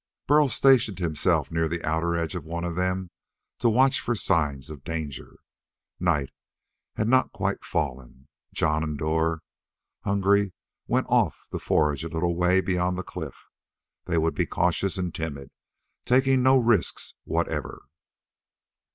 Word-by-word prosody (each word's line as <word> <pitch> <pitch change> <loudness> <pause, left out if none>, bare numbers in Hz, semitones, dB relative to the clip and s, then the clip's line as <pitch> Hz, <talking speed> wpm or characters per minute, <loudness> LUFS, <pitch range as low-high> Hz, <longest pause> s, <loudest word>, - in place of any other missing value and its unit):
Burl 150 0 +4
stationed 125 -8 +4
himself 85 -5 0
near 80 0 +1
the 85 +1 -4
outer 80 +2 0
edge 85 0 -2
of 90 -4 -5
one 85 +2 -5
of 85 -1 -3
them 90 0 -1 0.5
to 120 - +3
watch 130 +4 +4
for 120 - -1
signs 75 - 0
of 70 -3 -10
danger. 80 -4 -6 0.6
Night 80 -7 +1 0.6
had 110 - 0
not 130 +2 +3
quite - - -2
fallen. 65 -2 -4 0.2
Jon 75 0 +1
and 75 -2 -3
Dor, 80 +1 0 0.6
hungry, 100 -1 +2 0.3
went - - +1
off - - +1
to - - -3
forage 75 -1 +1
a 85 - -4
little 85 +1 -1
way 90 +2 +3
beyond 90 -1 0
the 95 - -3
cliff. - - -8 0.6
They 85 -2 0
would 80 0 +1
be - - -1
cautious 90 +3 0
and 90 -2 -2
timid, 70 -4 -5 0.5
taking 130 +1 +3
no 130 +1 +5
risks 115 -6 +1
whatever. - - -3
85 Hz, 145 wpm, -26 LUFS, 80-100 Hz, 0.6 s, no